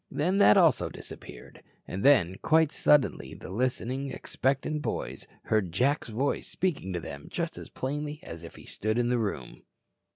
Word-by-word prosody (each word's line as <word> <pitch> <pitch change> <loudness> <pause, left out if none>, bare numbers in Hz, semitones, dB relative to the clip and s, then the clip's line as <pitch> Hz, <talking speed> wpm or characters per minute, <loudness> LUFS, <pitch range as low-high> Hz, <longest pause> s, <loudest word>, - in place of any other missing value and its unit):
Then, 180 +7 +1
that 105 - +7
also - - +4
disappeared. - - -11 0.3
And 95 - -4
then 100 -10 +5
quite 160 -1 +4
suddenly 145 -3 +2
the - - -9
listening, 130 +4 -1
expectant 135 +4 -1
boys - - -4 0.2
heard 105 -6 +1
Jack's 130 - +1
voice 130 +6 -1
speaking 165 - -2
to 90 - -1
them 70 -3 -8
just 170 -1 -3
as - - -9
plainly 150 +3 -4
as 85 0 -8
if 85 - -10
he - - -13
stood 110 +3 -2
in 120 0 +2
the 125 -1 +2
room. 100 - -4
130 Hz, 165 wpm, -28 LUFS, 100-150 Hz, 0.3 s, that